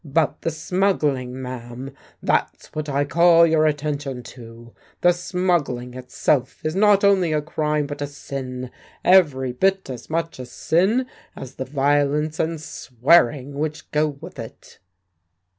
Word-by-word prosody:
"But 155 0 0
the - - -1
smuggling, 155 -7 -1
ma'am 125 +1 -7 0.3
that's - - -1
what 155 -1 -4
I 140 +1 +1
call 170 +2 +5
your 160 -1 +3
attention 145 -3 -3
to! 115 -1 -13 0.3
The 175 - +6
smuggling 175 -9 -1
itself 130 +1 -1
is 155 +2 -1
not 205 0 +4
only 190 -4 +4
a 150 - +1
crime 150 -1 -1
but 145 0 -7
a 145 - -1
sin; 130 -3 -6 0.3
every 145 -9 +4
bit 190 +4 0
as 125 - -9
much 165 -2 -2
a 125 - -7
sin 195 - +1 0.3
as 130 -1 -9
the 130 - -3
violence 145 +3 +1
and 160 0 -1
swearing 140 0 +2
which 155 0 -4
go 150 +1 +2
with - - -11
it." - - -11
150 Hz, 140 wpm, -22 LUFS, 130-165 Hz, 0.3 s, The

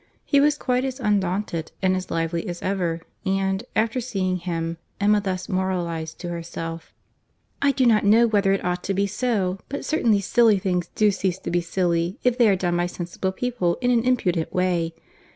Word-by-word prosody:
He 280 - +3
was 295 +1 +3
quite 250 -2 0
as 265 0 -3
undaunted 195 -6 -1
and 185 -1 +2
as 185 0 -4
lively 165 0 -2
as 175 -1 -5
ever; 180 -4 -1 0.2
and, 195 +1 0
after 230 +3 +1
seeing 190 -6 -1
him, 165 -2 -3 0.2
Emma 205 +1 +3
thus 185 -2 -3
moralised 175 -5 -2
to 175 - -4
herself:— 165 -1 -6 0.7
"I 280 - +4
do 260 -1 +1
not 225 -3 +4
know 220 +3 +6
whether 205 -3 +2
it 195 - 0
ought 180 0 -1
to 195 - -1
be 200 +1 +2
so, 200 -4 -1
but 285 - -4
certainly 230 -9 +2
silly 225 +1 +4
things 180 -2 -1
do 210 -1 +4
cease 190 -2 -1
to - - -5
be 175 0 +2
silly 170 0 0
if 250 -1 +3
they 240 -3 +5
are 195 - +4
done 175 -2 0
by 175 0 +1
sensible 175 +2 -4
people 190 -5 -1
in 250 -1 +1
an 235 -2 +3
impudent 185 -10 +1
way. 175 -3 0
190 Hz, 190 wpm, -24 LUFS, 175-220 Hz, 0.7 s, know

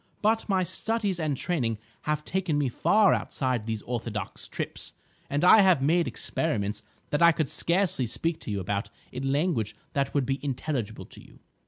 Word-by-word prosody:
But 220 +1 +2
my 190 -2 +3
studies 200 +1 -1
and 150 -4 -1
training 120 -11 -1 0.3
have 150 0 0
taken 185 -5 0
me 145 -3 +1
far 205 - +4
outside 125 -5 -1
these 110 -2 -3
orthodox 115 -3 -4
trips, - - -5 0.4
and 145 +5 +1
I 215 - +9
have 185 -6 +5
made 165 +4 +3
experiments 105 -10 -1 0.3
that 145 - +1
I 170 0 +8
could 155 -2 -1
scarcely 170 -8 +1
speak 165 +7 -1
to - - -8
you 100 -1 -1
about 100 +3 -2 0.2
in 135 +2 -2
language 140 - 0 0.2
that 140 0 -1
would 140 -2 +2
be 135 +2 -2
intelligible 135 -4 -3
to - - -14
you." - - -18
145 Hz, 175 wpm, -27 LUFS, 120-175 Hz, 0.4 s, I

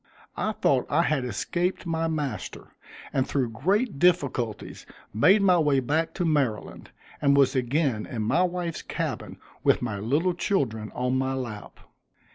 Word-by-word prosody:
I 215 - -1
thought 135 -10 +1
I 165 +4 +3
had 150 -6 0
escaped 175 +9 -2
my 165 -1 -1
master, 150 -4 -4 0.4
and 130 - +1
through 130 -4 0
great 190 - 0
difficulties 140 -11 0 0.3
made 190 - +5
my 180 -3 +5
way 145 -4 +3
back 155 +6 -1
to 180 - -1
Maryland, 140 -9 -1 0.3
and 140 -1 +4
was 140 0 +4
again 130 -2 0
in 115 -4 -3
my 110 +11 +2
wife's 175 -2 -2
cabin - - -4 0.3
with - - +3
my 105 -5 -3
little 145 - +1
children 125 - -1
on 125 +1 0
my 130 0 -1
lap. 120 -5 -7
140 Hz, 150 wpm, -26 LUFS, 125-175 Hz, 0.4 s, made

